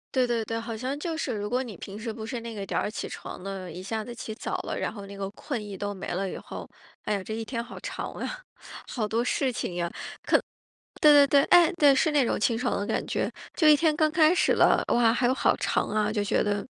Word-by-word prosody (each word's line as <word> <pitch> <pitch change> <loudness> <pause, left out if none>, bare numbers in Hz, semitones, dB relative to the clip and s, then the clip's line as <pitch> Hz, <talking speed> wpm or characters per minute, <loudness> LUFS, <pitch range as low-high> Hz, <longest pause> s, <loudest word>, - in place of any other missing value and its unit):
对 255 -1 +4
对 235 -2 -1
对， 225 +1 -3
好 230 0 -5
像 260 +5 -3
就 325 +2 -3
是， 265 -5 -2
如 205 0 -3
果 250 +3 +1
你 235 -6 -7
平 195 +3 -8
时 225 0 -4
不 220 - -7 0.2
那 230 -1 -7
个 200 -1 -4
点 - - -1
儿 - - -1
起 215 - -5
床 - - -8
的， 195 -2 -5
一 180 - -8
下 220 +3 -2
子 240 - -8
起 225 -1 -6
早 215 - -4
了， - - -4
然 - - -2
后 200 -3 -8
那 200 0 -9
个 195 -1 -3
困 235 +2 -5
意 205 -1 -7
都 205 +2 -3
没 190 - -7
了 190 +2 -2
以 - - -6
后， - - -8 0.4
哎 215 - -1
呀， 200 - -3
这 220 - -6
一 225 - -3
天 230 +1 -3
好 235 - -10
长 - - -5
啊， - - -5 0.5
好 230 -4 -2
多 225 +2 0
事 255 +2 0
情 185 -6 -4
呀， 170 -1 -1
可 - - -17 1.0
对 300 -1 +8
对 - - -4
对， 280 0 +5
哎， 350 -2 +6
对， 285 -4 +6
是 310 +3 +3
那 290 -3 +3
种 - - 0
清 225 +1 +1
爽 250 - 0
的 200 - -2
感 - - -1
觉， - - -1 0.2
就 325 - +1
一 305 -1 +8
天 315 0 +2
刚 310 0 +2
开 315 +2 +5
始 - - +3
了， - - +4
哇， 235 -1 +4
还 245 - +1
有 250 - +4
好 265 - +2
长 - - 0
啊， 210 0 0
就 215 -1 0
觉 205 - +1
得 205 -1 -1
230 Hz, 285 characters per minute, -27 LUFS, 205-265 Hz, 1.0 s, 对